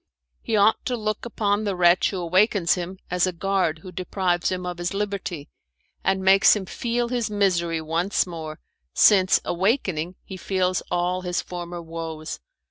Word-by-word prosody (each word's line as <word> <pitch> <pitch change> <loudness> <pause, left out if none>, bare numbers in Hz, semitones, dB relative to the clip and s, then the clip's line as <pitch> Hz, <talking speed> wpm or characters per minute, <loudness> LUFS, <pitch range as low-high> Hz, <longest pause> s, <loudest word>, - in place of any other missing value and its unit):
He 225 - -1
ought 210 +2 +3
to 250 - -1
look 215 0 -3
upon 210 -2 0
the 200 -3 -1
wretch 175 0 +4
who 195 - -4
awakens 185 +1 +2
him 180 +1 -5
as 180 0 +2
a - - 0
guard 180 -3 -1
who 185 - -9
deprives 180 0 -1
him 180 -1 -3
of 175 -1 -5
his 175 +2 -3
liberty, 195 -7 -3 0.6
and 190 0 +1
makes 195 +3 +6
him 200 -2 -4
feel 235 +4 -2
his 240 -3 -1
misery 175 -5 +1
once 165 +5 0
more, 160 -3 -7 0.4
since, 190 -3 +5
awakening, 185 - 0
he 190 - -8
feels 185 0 0
all 180 +1 0
his 180 -1 -2
former 175 -1 -6
woes. 160 -1 -6
185 Hz, 165 wpm, -24 LUFS, 175-200 Hz, 0.6 s, makes